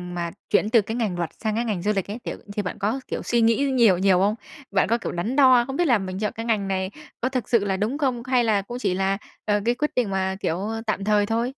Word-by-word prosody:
mà 170 Hz, -1 st, -3 dB, 0.2 s
chuyển 210 Hz, 0 st, +2 dB
từ 225 Hz, -1 st, +5 dB
cái 220 Hz, +3 st, -5 dB
ngành 210 Hz, -7 st, -1 dB
luật 170 Hz, -2 st, -2 dB
sang 215 Hz, -1 st, 0 dB
cái 235 Hz, +2 st, 0 dB
ngành 200 Hz, -6 st, -2 dB
du 210 Hz, -, +2 dB
lịch 195 Hz, -, -1 dB
ấy, 220 Hz, -, -5 dB
kiểu, -, -, -5 dB, 0.2 s
thì 210 Hz, -, -1 dB
bạn 180 Hz, -, -5 dB
có, 215 Hz, +7 st, 0 dB
kiểu, -, -, -4 dB
suy 240 Hz, -1 st, +1 dB
nghĩ 230 Hz, +5 st, +3 dB
nhiều 225 Hz, -8 st, +5 dB
nhiều 190 Hz, 0 st, +3 dB
không? 205 Hz, +3 st, +2 dB, 0.4 s
Bạn 195 Hz, -, +2 dB
có, 235 Hz, -, +3 dB
kiểu, -, -, -5 dB
đắn 200 Hz, +9 st, -2 dB
đo, 255 Hz, -4 st, +6 dB
không 270 Hz, -, -4 dB
biết 350 Hz, -2 st, +2 dB
là 240 Hz, -, +5 dB
mình 190 Hz, -1 st, -5 dB
chọn 210 Hz, 0 st, -1 dB
cái 225 Hz, +1 st, -5 dB
ngành 210 Hz, -4 st, 0 dB
này 190 Hz, 0 st, -1 dB, 0.3 s
có 255 Hz, -, +1 dB
thực 255 Hz, -3 st, -3 dB
sự 225 Hz, -4 st, +3 dB
là 190 Hz, -1 st, 0 dB
đúng 215 Hz, +8 st, -1 dB
không? 255 Hz, -5 st, -1 dB
Hay 255 Hz, -2 st, +2 dB
là 215 Hz, -3 st, +2 dB
cũng 240 Hz, +5 st, -7 dB
chỉ 180 Hz, -, 0 dB
là, 195 Hz, +1 st, 0 dB, 0.3 s
ờ, 205 Hz, -1 st, +2 dB
cái 240 Hz, -, +2 dB
quyết 300 Hz, +4 st, -1 dB
định 240 Hz, -5 st, +1 dB
mà, 190 Hz, 0 st, -1 dB
kiểu, 165 Hz, -2 st, -1 dB, 0.3 s
tạm 200 Hz, -2 st, -1 dB
thời 210 Hz, 0 st, +3 dB
thôi? 230 Hz, +3 st, 0 dB
215 Hz, 285 wpm, -24 LUFS, 195-240 Hz, 0.4 s, đo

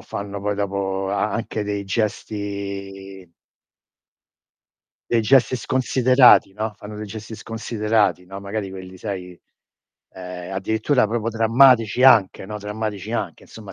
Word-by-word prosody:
fanno 100 Hz, 0 st, -6 dB
poi 105 Hz, +1 st, -1 dB
dopo 95 Hz, -1 st, -2 dB
a 100 Hz, +1 st, 0 dB
anche 110 Hz, -1 st, -3 dB
dei 100 Hz, -1 st, -3 dB
gesti 100 Hz, -2 st, -4 dB, 1.8 s
dei 115 Hz, -1 st, +3 dB
gesti 130 Hz, +2 st, +4 dB
sconsiderati, 130 Hz, -2 st, +4 dB
no. 110 Hz, 0 st, -3 dB
Fanno 105 Hz, +1 st, -9 dB
dei 105 Hz, -, -6 dB
gesti 110 Hz, +2 st, -8 dB
sconsiderati, 110 Hz, -3 st, -1 dB
no. 95 Hz, +2 st, -9 dB
Magari 100 Hz, 0 st, -4 dB
quelli 95 Hz, -1 st, -10 dB
sai, 90 Hz, -3 st, -6 dB, 0.7 s
ehm, 90 Hz, 0 st, -8 dB
addirittura 110 Hz, +6 st, +1 dB
proprio 115 Hz, +1 st, -2 dB
drammatici 115 Hz, +1 st, +4 dB
anche, 110 Hz, -8 st, +5 dB
no. 105 Hz, +2 st, -6 dB
Drammatici 105 Hz, 0 st, -5 dB
anche, 115 Hz, -, -4 dB
insomma, 105 Hz, -3 st, -12 dB
105 Hz, 120 wpm, -22 LUFS, 95-110 Hz, 1.8 s, anche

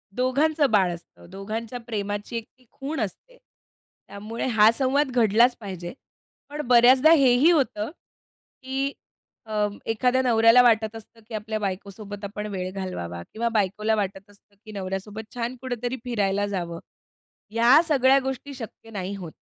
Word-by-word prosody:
दोघांचं 285 Hz, +4 st, +2 dB
बाळ 190 Hz, -4 st, +3 dB
असतं, 170 Hz, 0 st, -14 dB
दोघांच्या 215 Hz, +5 st, -5 dB
प्रेमाची 205 Hz, +1 st, -3 dB
एक 230 Hz, -, -4 dB
ती 255 Hz, -, -26 dB
खूण 285 Hz, +4 st, -5 dB
असते. -, -, -6 dB, 0.7 s
त्यामुळे 215 Hz, +3 st, -6 dB
हा 220 Hz, -3 st, +5 dB
संवाद 270 Hz, +1 st, +1 dB
घडलाच 240 Hz, +1 st, +4 dB
पाहिजे. 185 Hz, -5 st, -7 dB, 0.6 s
पण 295 Hz, +1 st, -4 dB
बऱ्याचदा 255 Hz, +5 st, +6 dB
हेही 275 Hz, 0 st, +5 dB
होतं, 265 Hz, -8 st, 0 dB, 0.7 s
की 270 Hz, +2 st, -2 dB, 0.5 s
अ, 210 Hz, -1 st, 0 dB, 0.2 s
एखाद्या 250 Hz, +3 st, +1 dB
नवऱ्याला 230 Hz, -1 st, +6 dB
वाटत 220 Hz, -2 st, +3 dB
असतं, 225 Hz, +1 st, -13 dB
की 235 Hz, -, -12 dB
आपल्या 215 Hz, +1 st, -3 dB
बायकोसोबत 200 Hz, +1 st, -6 dB
आपण 210 Hz, +1 st, -5 dB
वेळ 185 Hz, -1 st, -4 dB
घालवावा 180 Hz, -, -5 dB
किंवा 235 Hz, +2 st, -1 dB
बायकोला 210 Hz, +2 st, +1 dB
वाटत 195 Hz, -1 st, -4 dB
असतं, 205 Hz, 0 st, -24 dB
की 215 Hz, -, -10 dB
नवऱ्यासोबत 200 Hz, +2 st, -6 dB
छान 240 Hz, +1 st, -3 dB
कुठेतरी 245 Hz, 0 st, -3 dB
फिरायला 205 Hz, -5 st, 0 dB
जावं. 175 Hz, -4 st, -4 dB, 0.7 s
या 235 Hz, +7 st, +6 dB
सगळ्या 270 Hz, -3 st, +4 dB
गोष्टी 265 Hz, +1 st, -5 dB
शक्य 225 Hz, 0 st, -10 dB
नाही 195 Hz, -1 st, -4 dB
होत. 175 Hz, -5 st, -8 dB
225 Hz, 140 wpm, -25 LUFS, 200-255 Hz, 0.7 s, बऱ्याचदा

